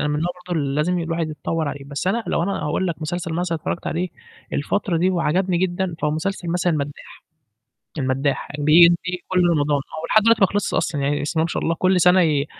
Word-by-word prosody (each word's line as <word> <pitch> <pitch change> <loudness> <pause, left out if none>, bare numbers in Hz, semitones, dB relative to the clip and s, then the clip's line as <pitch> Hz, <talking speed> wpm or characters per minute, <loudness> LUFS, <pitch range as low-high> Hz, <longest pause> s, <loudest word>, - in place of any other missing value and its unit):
أنا 150 - 0
من 150 0 -1
نوع 175 - 0 0.2
برضه 170 -3 -1
اللي 140 -1 -2
لازم 175 +4 +1
الواحد 165 -1 -2
يتطوّر 155 0 -2
عليه، 140 -1 -6
بس 140 +5 -5
أنا 225 +3 0
لو 165 - 0
أنا 195 +2 -2
أقول 150 +5 -1
لك 170 - -1
مسلسل 170 +1 -3
مثلًا 170 0 -1
اتفرّجت 170 - -4
عليه 180 +2 -1 0.4
الفترة 175 +4 -1
دي 180 +3 +2
وعجبني 180 +1 +1
جدًا، 180 -1 -1
فهو 150 - +2
مسلسل 175 +3 -3
مثلًا 175 0 +1
المدّاح. 145 -2 -5 0.8
المدّاح 135 +1 -1
بييجي 170 +4 +4
كل 180 -2 +3
رمضان 145 -3 +1 0.2
ولحد 215 +6 +3
دلوقتي 230 0 +4
ما 195 - +7
خلصش 205 0 -2
أصلًا، 150 -3 0
يعني 145 +1 0
بسم 155 +3 -2
الله - - +2
ما - - -2
شاء - - -3
الله 165 - +1
كل 185 +2 +2
سَنة 180 +2 +5
ي 150 -3 +1
170 Hz, 215 wpm, -22 LUFS, 150-180 Hz, 0.8 s, ما